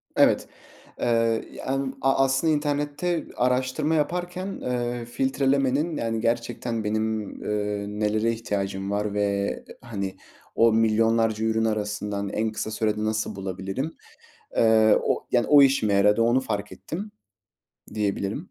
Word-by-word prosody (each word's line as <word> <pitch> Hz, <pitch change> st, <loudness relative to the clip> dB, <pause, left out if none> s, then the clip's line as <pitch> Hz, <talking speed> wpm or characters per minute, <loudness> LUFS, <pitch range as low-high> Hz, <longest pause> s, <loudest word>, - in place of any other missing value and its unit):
Evet, -, -, +4 dB, 0.5 s
ııı, 115 Hz, -1 st, +2 dB
yani, 135 Hz, 0 st, -2 dB
a 135 Hz, 0 st, +3 dB
aslında 135 Hz, +4 st, +2 dB
internette 145 Hz, +3 st, -1 dB
araştırma 130 Hz, +5 st, +1 dB
yaparken, 175 Hz, +4 st, -1 dB
ııı, 120 Hz, -9 st, -3 dB
filtrelemenin, 135 Hz, +4 st, +1 dB
yani, 115 Hz, -1 st, -1 dB
gerçekten 115 Hz, 0 st, -1 dB
benim, 110 Hz, +1 st, 0 dB, 0.2 s
ııı, 105 Hz, 0 st, -2 dB
nelere 110 Hz, +2 st, +1 dB
ihtiyacım 100 Hz, -3 st, -3 dB
var 105 Hz, 0 st, -1 dB
ve, 100 Hz, -1 st, -1 dB, 0.2 s
hani, 100 Hz, -5 st, -4 dB, 0.4 s
o 115 Hz, -1 st, +5 dB
milyonlarca 110 Hz, 0 st, +2 dB
ürün 110 Hz, 0 st, +1 dB
arasından 105 Hz, -2 st, -2 dB
en 110 Hz, +2 st, -1 dB
kısa 110 Hz, 0 st, -4 dB
sürede 105 Hz, -1 st, -1 dB
nasıl 110 Hz, -1 st, -1 dB
bulabilirim, 95 Hz, -, -4 dB, 0.6 s
eee, 110 Hz, -1 st, +5 dB
o -, -, -1 dB
yani, 120 Hz, -2 st, +2 dB
o 145 Hz, -1 st, +8 dB
işime 135 Hz, -7 st, +4 dB
yaradı, 105 Hz, +3 st, +4 dB
onu 120 Hz, +3 st, +4 dB
fark 105 Hz, -5 st, -3 dB
ettim 205 Hz, +6 st, -6 dB, 0.8 s
diyebilirim. 105 Hz, -, -2 dB
115 Hz, 125 wpm, -25 LUFS, 105-135 Hz, 0.8 s, o